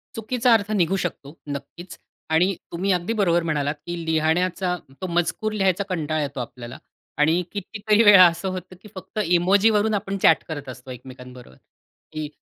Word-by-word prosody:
चुकीचा 235 +2 +1
अर्थ 210 -1 +1
निघू 175 +3 +1
शकतो. 150 -2 -7
नक्कीच. 145 +5 -8 0.3
आणि 180 +5 +2 0.2
तुम्ही 185 +4 -1
अगदी 180 +5 -1
बरोबर 175 -3 +2
म्हणालात 150 -2 -1
की 175 0 -4
लिहण्याचा 175 +3 0 0.3
तो 185 - -3
मजकूर 175 +4 -1
लिहायचा 195 -2 +1
कंटाळा 155 -3 -1
येतो 140 -2 -4
आपल्याला. 120 0 -8 0.4
आणि 160 +4 +3
कितीतरी 210 +2 0
वेळा 200 -4 +9
असं 170 +2 -3
होतं 185 0 -7
की 210 - -13
फक्त 190 +3 -7
इमोजीवरून 205 +5 +3
आपण 195 -1 -2
चॅट 160 - +5
करत 145 -4 -6
असतो 130 +1 -10
एकमेकांबरोबर 125 - -12 0.6
की 155 -1 -4
175 Hz, 155 wpm, -23 LUFS, 150-195 Hz, 0.6 s, वेळा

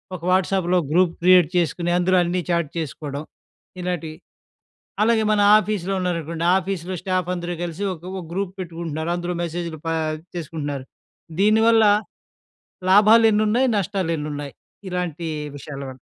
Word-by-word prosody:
ఒక 175 - -9
వాట్సాప్‌లో 185 -1 +2
group 175 +1 +3
create 180 -2 +6
చేసుకొని 170 +1 0
అందులో 185 +1 +2
అన్నీ 175 +1 -1
చాట్ 170 -3 +1
చేసుకోవడం 145 -1 -5 0.6
ఇలాంటివి. 165 -3 -4 0.9
అలాగే 225 0 +3
మన 210 -1 +3 0.2
ఆఫీస్‌లో 200 -3 -1
ఉన్నారనుకోండి, 170 -2 -2
ఆఫీస్‌లో 185 -1 -3
స్టాఫ్ 185 -1 -1
అందరూ 175 0 -4
కలిసి 175 +3 -4
ఒక 165 -2 -13
ఒక 190 -1 -5
గ్రూప్ 190 +1 -3
పెట్టుకుంటున్నారు. 165 -2 -4
అందులో 175 0 -3
మెసేజ్‌లు 170 -1 -4
పా 165 - 0 0.4
చేసుకుంటున్నారు. 145 -5 -4 0.6
దీనివల్ల 220 +2 +5 1.1
లాభాలెన్నున్నాయి? 215 +3 +5
నష్టాలెన్నున్నాయి? 160 -7 -3 0.4
ఇలాంటీ 175 -2 -3 0.3
విషయాల 140 0 -8
వల్ల? 130 - -12
175 Hz, 120 wpm, -22 LUFS, 165-190 Hz, 1.1 s, create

